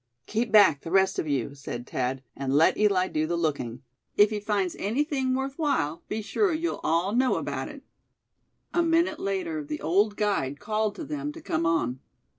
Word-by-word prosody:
"Keep 225 +2 -1
back, 200 -10 +6
the - - -7
rest 190 +1 +3
of - - -2
you," 140 -2 -1
said 130 -3 -7
Thad, 130 +1 -2
"and 135 0 -1
let 155 +3 +5
Eli 195 -3 +3
do 155 -2 -1
the 170 +1 -1
looking. 135 -7 -2 0.3
If 205 +1 +6
he 210 - -1
finds 205 -4 -1
anything 265 - 0
worth 270 +3 -3
while, 165 - 0
be 220 0 -3
sure 360 - +1
you'll 330 +2 -2
all 170 +5 +1
know 255 +2 +3
about - - -3
it." - - -11 0.9
A 345 - +3
minute 335 +1 +2
later 185 -6 -2
the 150 +1 -5
old 205 +6 +2
guide 195 -10 0
called 215 0 -1
to - - -6
them 295 0 -4
to 330 - -10
come 165 - -1
on. 130 -7 0
195 Hz, 190 wpm, -27 LUFS, 155-240 Hz, 0.9 s, back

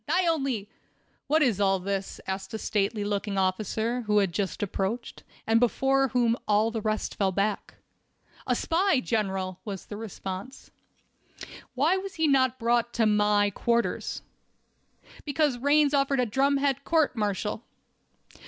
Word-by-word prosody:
"I 365 - +2
only—" 270 -11 0 0.6
"What 310 +2 +3
is 220 -7 +1
all 195 -1 +3
this?" 195 +1 -4
asked 190 +3 -4
a - - -1
stately 210 0 -1
looking 205 0 -2
officer, 215 +5 0
who 210 0 +3
had 195 -4 +2
just 195 +2 -2
approached, 205 +4 -3 0.2
and 225 +1 +3
before 270 +3 +2
whom 240 -2 +2
all 215 +2 +3
the 225 -1 -3
rest 215 0 -2
fell 195 -2 0
back. 200 +2 -2 0.7
"A - - +2
spy, 350 -2 +2
General," 190 -6 -2
was 200 -4 -6
the 205 - -7
response. 200 +2 -7 1.0
"Why 310 +9 +3
was 385 0 -6
he 320 -1 +1
not 260 -3 +3
brought 235 0 +1
to 230 - +2
my 210 -1 +3
quarters?" 235 +4 -1 1.0
"Because 285 -3 0
Raines 290 +2 +3
ordered 275 -1 +2
a 250 - +3
drumhead 275 +3 +1
court 320 -5 +2
martial." 210 0 -2
225 Hz, 145 wpm, -27 LUFS, 205-270 Hz, 1.0 s, What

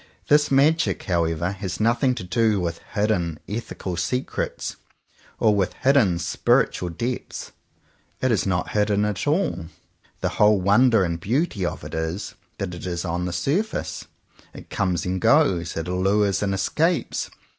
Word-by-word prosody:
This 150 0 +5
magic," 150 +4 +3
however, 85 -1 0
has 95 -1 -5
nothing 120 +3 +2
to 115 - -5
do 110 +2 +1
with 85 -2 -3 0.2
hidden 95 -7 0
ethical 100 -4 -5
secrets, 125 +10 -3 0.6
or 110 - +4
with 95 -3 0
hidden 130 -10 +3
spiritual 85 +1 +1
depths. 120 +9 -4 0.7
It 130 - +1
is 105 -3 +1
not 95 -2 0
hidden 105 0 +1
at 105 +2 -2
all. 145 - 0 0.5
The - - +1
whole 105 -1 +6
wonder 105 +3 +4
and 85 -2 -2
beauty 110 - 0
of - - -5
it - - -8
is 80 +4 -3 0.2
that 95 -2 -4
it 90 +1 -7
is 85 0 -3
on 90 +1 -2
the 90 - -2
surface. 145 - -2 0.5
It - - -12
comes 90 -3 0
and 90 0 -2
goes. 95 - +3
It 80 - -3
allures 95 +2 +1
and 100 -1 0
escapes. 165 - 0
100 Hz, 150 wpm, -23 LUFS, 90-120 Hz, 0.7 s, whole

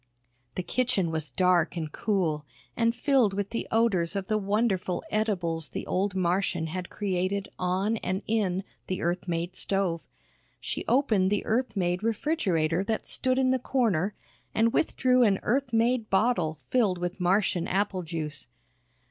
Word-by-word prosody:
The 185 - -2
kitchen 235 -7 0
was 160 -2 -2
dark 175 +4 +2
and 155 -2 -3
cool, 170 -8 0 0.3
and 230 0 +2
filled 245 -6 +2
with 200 0 -2
the 230 - -3
odors 210 -6 +2
of 195 -1 -2
the 215 - +2
wonderful 200 -3 0
edibles 175 -7 -1
the - - -5
old 195 +1 0
Martian 180 -2 0
had 175 +2 -5
created 195 0 -1
on 190 +5 0
and 190 -1 -3
in 200 -4 0 0.2
the 185 - -3
Earth 175 +2 -1
made 170 +1 -2
stove. 190 -4 -1 0.5
She - - -3
opened 220 -8 +3
the 205 0 0
Earth 235 -1 0
made 180 0 0
refrigerator 195 - 0
that 220 +1 -2
stood 255 0 0
in 260 -1 +3
the 260 - +2
corner 215 -8 0 0.4
and 225 +1 +3
withdrew 255 -5 +2
an 205 -5 +4
Earth 260 +2 0
made 230 0 +2
bottle 190 -6 +2
filled 215 -8 +3
with 175 +2 -4
Martian 185 0 +2
apple 195 -1 0
juice. 155 -3 -5
195 Hz, 155 wpm, -28 LUFS, 175-225 Hz, 0.5 s, an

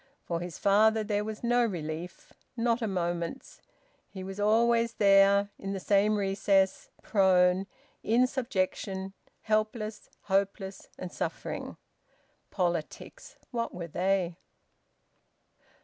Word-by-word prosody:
For 170 -1 -3
his 175 -2 -6
father 215 +2 +4
there 210 -1 -1
was 215 +1 -6
no 240 +1 +3
relief, 170 -4 -5 0.2
not 235 +1 +1
a 225 - 0
moment's. 175 -3 -3 0.5
He 190 -2 -8
was 195 +1 -7
always 230 +2 +3
there, 200 0 +5
in 195 0 -4
the 195 - -3
same 205 +2 +3
recess, 195 -1 +1
prone, 185 -1 +3 0.3
in 235 +4 +3
subjection, 195 -6 -2 0.3
helpless, 215 0 -2
hopeless, 195 0 -2
and 180 -1 -6
suffering. - - -5 0.7
Politics! 175 -4 -3 0.2
What 230 -5 -3
were 175 -1 -5
they? 180 +1 0
195 Hz, 110 wpm, -29 LUFS, 185-215 Hz, 0.7 s, there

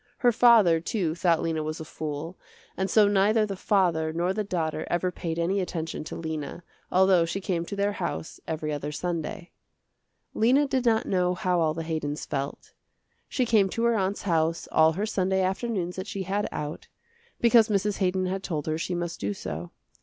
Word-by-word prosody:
Her 245 - +4
father, 220 -8 +6
too, 170 -1 -1
thought 170 -1 +2
Lena 160 -1 -1
was 155 +1 -4
a 160 - -6
fool, 155 +3 -5 0.4
and 190 0 -1
so 210 +2 +5
neither 205 +2 +3
the 200 -2 -4
father 175 -5 +1
nor 175 +3 0
the 215 +1 -1
daughter 160 -5 -2
ever 175 +1 0
paid 165 -2 -4
any 180 +4 +1
attention 165 -4 -4
to - - -6
Lena, 160 0 -5 0.3
although 185 -2 +5
she 165 +4 -2
came 180 -4 -2
to 200 - -5
their 200 +1 +1
house 175 -4 -4
every 155 -1 -2
other 145 0 -4
Sunday. 175 +3 -4 0.8
Lena 260 +6 +3
did 260 -2 0
not 225 -1 +3
know 180 -1 +1
how 180 -3 0
all 160 -1 +1
the 165 - -3
Haydons 155 -2 -3
felt. 140 0 -5 0.6
She 255 - 0
came 215 -4 +3
to 230 - -2
her 235 0 +3
aunt's 195 -1 -1
house 165 -3 0
all 160 0 +5
her 200 +6 -1
Sunday 190 -2 0
afternoons 190 -2 -2
that 185 +2 -4
she 195 -3 -4
had 200 +3 -1
out, 150 +1 -5 0.5
because 235 -1 +5
Mrs. 205 0 +1
Haydon 185 -1 +1
had 190 +1 -2
told 155 -6 -3
her 155 0 -1
she 175 +2 -2
must 175 -1 -4
do 100 0 -2
so. 80 0 -6
180 Hz, 190 wpm, -27 LUFS, 160-200 Hz, 0.8 s, father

